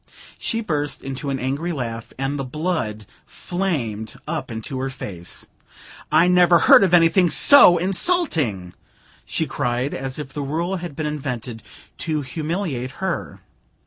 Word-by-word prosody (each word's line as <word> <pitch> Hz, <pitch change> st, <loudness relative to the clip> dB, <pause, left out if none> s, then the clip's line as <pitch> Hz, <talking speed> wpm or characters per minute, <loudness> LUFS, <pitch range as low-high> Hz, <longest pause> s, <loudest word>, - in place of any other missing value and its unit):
She 230 Hz, -, -2 dB
burst 150 Hz, -8 st, -3 dB
into 135 Hz, +1 st, -5 dB
an 135 Hz, -, -1 dB
angry 140 Hz, +7 st, -2 dB
laugh, 115 Hz, -6 st, -5 dB
and 135 Hz, +2 st, -2 dB
the -, -, -2 dB
blood 130 Hz, -, -3 dB, 0.2 s
flamed 130 Hz, -, -3 dB
up 155 Hz, -2 st, -4 dB
into 115 Hz, +3 st, -5 dB
her 135 Hz, +1 st, -2 dB
face. 95 Hz, -10 st, -7 dB, 0.7 s
"I 170 Hz, -, +5 dB
never 180 Hz, -1 st, +5 dB
heard 170 Hz, -, +7 dB
of 190 Hz, -, +2 dB
anything 175 Hz, +1 st, +4 dB
so 180 Hz, -, +7 dB
insulting!" 170 Hz, -, +1 dB, 0.5 s
she -, -, -2 dB
cried, 125 Hz, +3 st, -2 dB
as 135 Hz, 0 st, -4 dB
if 145 Hz, -2 st, -7 dB
the 145 Hz, -, -4 dB
rule 165 Hz, +7 st, -2 dB
had 175 Hz, -4 st, -7 dB
been 155 Hz, -, -3 dB
invented 125 Hz, -6 st, -5 dB, 0.4 s
to 155 Hz, -2 st, -1 dB
humiliate 150 Hz, -3 st, -4 dB
her. 190 Hz, +5 st, -4 dB
145 Hz, 145 wpm, -21 LUFS, 130-175 Hz, 0.7 s, heard